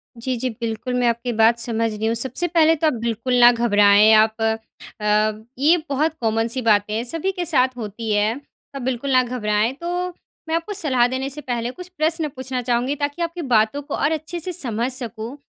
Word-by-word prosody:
जी, 250 +2 -3
जी, 255 +2 -2
बिल्कुल, 230 +1 -4
मैं 250 -1 +1
आपकी 235 +1 -1
बात 230 +1 +5
समझ 230 -1 -1
रही 215 +1 -4
हूँ। 230 - 0
सबसे 265 +8 -1
पहले 325 -1 +4
तो 315 +1 +1
आप 300 - +2
बिल्कुल 235 +2 -2
ना 240 0 +8
घबराएँ 210 -2 +5
आप 220 +1 +3 0.6
अ, 215 +1 +1 0.2
ये 320 +5 +5
बहुत 305 +4 0
कॉमन 225 0 +1
सी 255 +2 -3
बातें 210 -2 +2
हैं, 225 +2 -1
सभी 330 +9 -2
के 355 -2 -4
साथ 255 -5 +1
होती 220 0 -5
हैं। 210 +3 +1 0.4
आप 275 - -5
बिल्कुल 260 +2 -2
ना 255 -1 +5
घबराएँ। 225 -1 0
तो 355 +1 -2 0.4
मैं 325 - +1
आपको 335 +5 -3
सलाह 260 -10 +2
देने 260 +2 -3
से 300 +2 -7
पहले 240 -2 -3
कुछ 360 +5 -10
प्रश्न 315 0 0
पूछना 260 -1 -4
चाहूँगी, 245 +3 0
ताकि 285 +4 -3
आपकी 335 +1 -3
बातों 240 +1 +1
को 285 - -5
और 290 +3 0
अच्छे 315 +2 -4
से 365 +3 -3
समझ 245 -6 -1
सकूँ। 240 0 -3
250 Hz, 205 wpm, -21 LUFS, 225-290 Hz, 0.6 s, ना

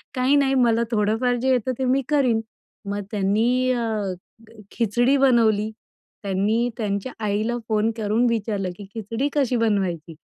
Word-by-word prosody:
"काही 255 +3 +3
नाही, 275 -1 +3
मला 235 -2 +3
थोडंफार 225 +3 +1
जे 265 - +1
येतं 255 0 +1
ते 260 - 0
मी 265 +2 +2
करीन." 255 -7 +2 0.5
मग 205 0 -2
त्यांनी 225 +6 +1
अ, 220 -5 -1 0.6
खिचडी 240 +4 +2
बनवली. 225 -5 +3 0.5
त्यांनी 205 +5 0
त्यांच्या 205 +2 -2
आईला 215 +4 0
फोन 215 0 +2
करून 220 +2 +1
विचारलं 205 -4 -2
की, 205 - -9
"खिचडी 230 +5 -2
कशी 270 -4 +1
बनवायची?" 190 -8 -1
225 Hz, 140 wpm, -23 LUFS, 205-250 Hz, 0.6 s, काही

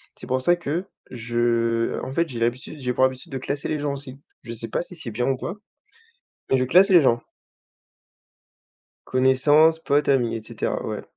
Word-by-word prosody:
C'est - - -9
pour 130 0 0
ça 175 +7 +4
que 175 +1 -3 0.3
je, 115 -1 0
en - - -6
fait, 170 +3 +1
j'ai 120 -3 -6
l'habitude 120 +6 -2
j'ai 125 -2 -2
pour 130 - +1
habitude 130 +1 -4
de 135 - -3
classer 140 +3 -3
les 155 - -2
gens, 145 -1 -2
aussi. 135 -1 -9 0.2
Je 115 - -8
sais 115 0 -5
pas - - -1
si 175 +1 -6
c'est 150 -8 -5
bien 120 +3 -1
ou 135 - +1
quoi. 200 - -6 0.9
Mais, 135 - +4
je 130 - +1
classe 185 +10 +5
les 180 -3 +8
gens 120 -5 +2 1.8
connaissances, 145 +5 +4
potes, 145 -2 +1
amis 120 -4 +2
et 110 - -6
cetera. - - -3
Ouais. - - -4
130 Hz, 195 wpm, -23 LUFS, 120-150 Hz, 1.8 s, les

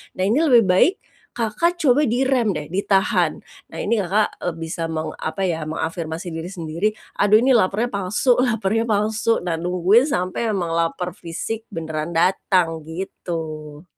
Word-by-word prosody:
nah 185 - -1
ini 225 +8 +2
lebih 250 -8 +5
baik, 295 - +4 0.4
Kakak 240 +10 0
coba 290 +1 +4
direm 245 -3 +1
deh, 150 0 -6
ditahan. 195 +1 +1 0.2
Nah - - -9
ini 230 - +1
Kakak, 205 +3 0
e - - -4
bisa 165 0 -4
meng 160 -1 -3
apa 195 +5 -3
ya, 165 -4 -1
mengafirmasi 160 +2 -4
diri 165 +1 -5
sendiri, 170 +1 -2 0.3
"Aduh, 205 +1 +5
ini 265 - +4
lapernya 225 +1 +2
palsu, 205 +6 +1
lapernya 225 -2 +1
palsu." 215 +1 +1
Nah, 170 -2 -2
nungguin 180 - +3
sampai 185 -2 -1
memang 175 -3 -2
laper 175 +2 -1
fisik 200 +7 -6
beneran 160 -1 -4
datang 175 -1 +2
gitu. 160 -3 -6
185 Hz, 150 wpm, -21 LUFS, 165-225 Hz, 0.4 s, lebih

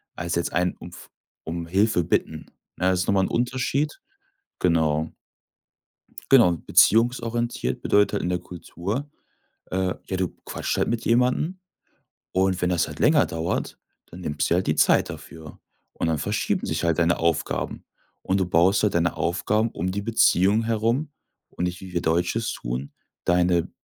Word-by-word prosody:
als 85 0 -3
jetzt 85 - -1
ein 90 +1 +1
umf - - -12 0.3
um 85 +1 -5
Hilfe 95 +1 +2
Bitten, - - -1 0.3
ne? 90 +1 +2
Das 90 -1 +1
ist - - -3
noch - - +2
mal 95 - +3
'n - - 0
Unterschied, 130 +5 -1 0.6
genau. 80 -3 +1 1.2
Genau, 115 -10 +7
beziehungsorientiert 120 +6 +2
bedeutet 105 +1 +3
halt 100 - -1
in 90 - -1
der 90 0 0
Kultur: 90 - -5 0.6
Äh, 95 0 0
ja, 95 - -3
du 90 -1 0 0.2
quatscht - - -3
halt - - +1
mit 115 -1 -2
jemandem 125 +9 +1 0.7
und 95 -1 +1
wenn 90 - +2
das 85 -2 +1
halt - - -9
länger - - +4
dauert, 80 +1 -3 0.3
dann 90 - -12
nimmst 75 -4 -2
dir - - +2
halt 90 +2 0
die 75 - +2
Zeit - - +3
dafür 80 -2 -10 0.3
und - - -3
dann 80 -2 0
verschieben 75 - -1
sich - - -2
halt 85 -1 +1
deine 85 0 +2
Aufgaben. 85 -1 -1 0.4
Und 95 - 0
du 95 - +1
baust 90 +3 +3
halt 105 - +1
deine 85 0 +1
Aufgaben 105 +6 0
um 90 +3 -3
die 100 +2 -2
Beziehung 105 -1 +3
herum 115 +6 0 0.4
und 90 - -4
nicht, 90 0 -3
wie 95 -1 -10
wir 85 - 0
Deutsche 85 +6 +1
es 115 - -2
tun, 60 +4 -5 0.3
deine 90 -1 +2
90 Hz, 170 wpm, -24 LUFS, 85-110 Hz, 1.2 s, Genau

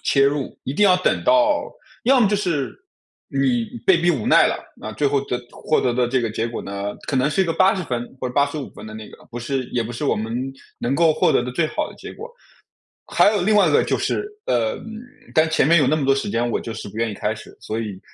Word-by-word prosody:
切 140 -1 +3
入， 140 -1 -2
一 130 - -3
定 210 - +3
要 185 - +6
等 185 - 0
到 300 -1 +3 0.3
要 255 +1 +4
么 210 - +4
就 205 - +1
是 165 - -2 0.5
你 130 -4 +1 0.2
被 190 - +6
逼 175 +1 +2
无 135 -10 -2
奈 - - +6
了， - - -2 0.2
那 110 - -7
最 145 - +1
后 140 0 +2
得 125 - -2
获 155 - 0
得 125 -2 0
的 125 -1 +1
这 130 0 +1
个 115 - -1
结 110 +2 -2
果 115 - -5
呢， 100 +1 -5
可 - - -2
能 130 +3 +2
是 190 - +1
一 - - +4
个 165 - 0
80 185 +2 +3
分 120 -3 -3 0.2
或 - - -2
者 125 - -9
85 145 0 0
分 - - -12
的 110 - -9
那 110 0 -9
个， - - -16
不 120 - -6
是 130 +2 -2
也 120 - -1
不 120 - -6
是 120 - -4
我 - - +2
们 110 +2 -3 0.4
能 125 +3 -1
够 165 0 +4
获 - - +2
得 - - +3
的 125 +1 -4
最 165 - +1
好 305 - -2
的 - - -12
结 - - -9
果。 465 - -9 0.8
还 - - +4
有 195 - 0
另 215 +3 +2
外 200 -5 +5
一 - - +1
个 - - +4
就 - - 0
是 410 - -1 0.2
呃， 115 -2 +1 0.6
但 160 -1 +4
前 160 - +2
面 170 +1 +6
有 145 - +3
那 145 - +3
么 145 - -1
多 135 - +4
时 135 - -2
间 120 +1 0
我 - - -1
就 115 - -6
是 110 -1 -7
不 105 - -12
愿 115 0 0
意 - - -6
开 105 +2 -1
始， - - -13
所 110 - -4
以 105 -4 -5
135 Hz, 285 characters per minute, -21 LUFS, 120-170 Hz, 0.8 s, 要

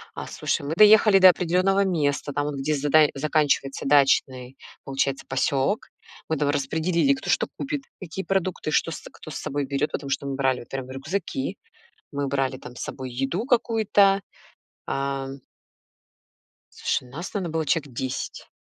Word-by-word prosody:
А, - - -6
слушай, - - -2
мы 145 +3 -3
доехали 210 0 +7
до 185 -1 +9
определённого 185 +3 +2
места, 145 -5 0
там 145 +1 -1
вот, 150 - -3
где 150 +3 0
задач 150 +1 +4
заканчивается 145 -1 0
дачный, 135 -2 +2 0.3
получается, 135 0 -1
посёлок. 135 +8 0 0.4
Мы 160 - 0
там 145 -1 +1
распределили, 160 - +1
кто 270 - -6
что - - +2
купит, 285 0 -3 0.2
какие 190 +2 -6
продукты, 185 -4 -1
что 165 - +1
с - - -6
кто 155 - -11
с - - -7
собой 140 0 -3
берёт, 140 +2 -1
потому 140 - -4
что 140 - -1
мы 135 - -2
брали, 130 -2 +1
вот - - -12
прям, 130 -1 -5
рюкзаки, 135 +1 -4 0.5
мы 140 0 -2
брали 135 -1 -1
там 125 - -11
с - - -8
собой 130 -1 -6
еду 135 - -2
какую-то, 215 -5 +3 0.7
а 135 0 -2 1.4
Слушай, 130 - -2
нас 165 +6 -5
там, 200 - -2
на 170 - -3
было 160 -1 -1
человек 145 -2 -1
10. 130 +2 -4
145 Hz, 165 wpm, -25 LUFS, 135-185 Hz, 1.4 s, до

